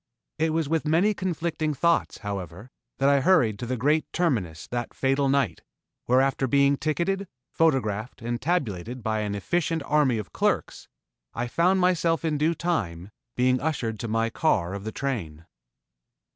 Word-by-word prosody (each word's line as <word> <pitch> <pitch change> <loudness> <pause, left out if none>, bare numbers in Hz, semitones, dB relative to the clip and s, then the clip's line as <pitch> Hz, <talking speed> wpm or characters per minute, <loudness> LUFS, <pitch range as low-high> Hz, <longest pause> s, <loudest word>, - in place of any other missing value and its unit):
It 160 0 +2
was 160 -1 0
with 160 0 0
many 175 +7 +3
conflicting 170 -5 -2
thoughts, 170 +3 +1
however, 100 +3 -6 0.3
that 135 - +2
I 140 0 +5
hurried 130 - +3
to 120 - -4
the 130 +1 -2
great 150 +6 +1
Terminus 110 - -1
that 120 -1 -4
fatal 135 +1 +1
night, 140 0 +1 0.4
where 125 +2 +4
after 135 0 +1
being 140 +1 +4
ticketed, 175 +7 -1 0.2
photographed 125 -8 0
and 120 0 -3
tabulated 125 - -2
by 110 -1 0
an 105 -1 -2
efficient 160 - -1
army 145 -6 +2
of 105 -3 -6
clerks, - - -1 0.5
I 120 - -1
found 180 +9 +2
myself 170 -3 +2
in 150 -2 0
due 160 +3 +2
time, 105 - -2 0.2
being 125 0 +2
ushered 125 -8 -2
to 115 - -4
my 115 +1 0
car 95 - +1
of 100 +1 -6
the 110 - -3
train. 90 - -4
135 Hz, 160 wpm, -26 LUFS, 110-160 Hz, 0.5 s, I